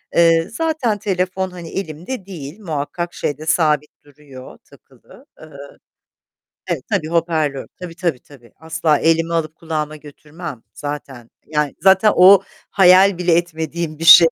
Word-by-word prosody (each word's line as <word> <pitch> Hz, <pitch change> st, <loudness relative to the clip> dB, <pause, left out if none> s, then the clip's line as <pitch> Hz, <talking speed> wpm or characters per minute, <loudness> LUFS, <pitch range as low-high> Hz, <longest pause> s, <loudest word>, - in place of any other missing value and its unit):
Eee, 165 Hz, -1 st, +4 dB
zaten 305 Hz, -7 st, -1 dB
telefon, 190 Hz, -1 st, -2 dB
hani, 170 Hz, -2 st, -9 dB
elimde 185 Hz, -, -6 dB
değil, 170 Hz, -2 st, -9 dB
muhakkak 170 Hz, -1 st, -4 dB
şeyde 150 Hz, +2 st, -4 dB
sabit 155 Hz, -2 st, +1 dB
duruyor 140 Hz, -3 st, -14 dB
takılı. -, -, -20 dB, 0.2 s
Iıı 155 Hz, -3 st, -13 dB, 1.1 s
Evet -, -, -3 dB
tabii 190 Hz, -7 st, -1 dB
hoparlör. 160 Hz, -4 st, -1 dB
Tabii, 175 Hz, -2 st, -8 dB
tabii, 170 Hz, -9 st, -2 dB
tabii. 120 Hz, -6 st, -19 dB
Asla 160 Hz, -1 st, 0 dB
elime 165 Hz, +1 st, +1 dB
alıp 160 Hz, -2 st, -2 dB
kulağıma 155 Hz, -2 st, -4 dB
götürmem 150 Hz, -2 st, -10 dB
zaten. 140 Hz, -5 st, -7 dB, 0.2 s
Yani 150 Hz, -2 st, -1 dB
zaten 195 Hz, +2 st, +5 dB
o 190 Hz, +2 st, +7 dB, 0.3 s
hayal 190 Hz, 0 st, +5 dB
bile 180 Hz, -1 st, +1 dB
etmediğim 165 Hz, -2 st, -3 dB
bir 165 Hz, -, -5 dB
şey. 165 Hz, 0 st, +9 dB
165 Hz, 135 wpm, -19 LUFS, 150-180 Hz, 1.1 s, şey